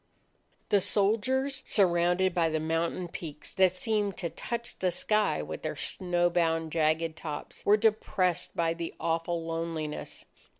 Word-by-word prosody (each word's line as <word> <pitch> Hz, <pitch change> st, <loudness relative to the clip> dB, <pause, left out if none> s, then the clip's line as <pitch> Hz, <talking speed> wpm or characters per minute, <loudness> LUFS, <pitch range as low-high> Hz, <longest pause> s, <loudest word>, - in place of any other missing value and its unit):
The 205 Hz, -, +5 dB
soldiers, 255 Hz, +8 st, +1 dB
surrounded 180 Hz, -1 st, +2 dB
by 170 Hz, -2 st, +2 dB
the 155 Hz, 0 st, 0 dB
mountain 165 Hz, +3 st, -1 dB
peaks 155 Hz, -3 st, -7 dB
that 185 Hz, -1 st, +4 dB
seemed 210 Hz, -1 st, 0 dB
to 170 Hz, -3 st, -3 dB
touch 235 Hz, 0 st, -4 dB
the 185 Hz, -, +2 dB
sky 210 Hz, -, +1 dB
with 80 Hz, +1 st, -6 dB
their -, -, -3 dB
snow 175 Hz, -1 st, 0 dB
bound 165 Hz, -2 st, +1 dB
jagged 160 Hz, 0 st, +1 dB
tops, 150 Hz, -3 st, -6 dB
were 210 Hz, +1 st, +7 dB
depressed 190 Hz, -5 st, +1 dB
by 165 Hz, -1 st, +1 dB
the 165 Hz, 0 st, -5 dB
awful 165 Hz, 0 st, -1 dB
loneliness. 165 Hz, -2 st, -4 dB
175 Hz, 140 wpm, -29 LUFS, 165-200 Hz, -, were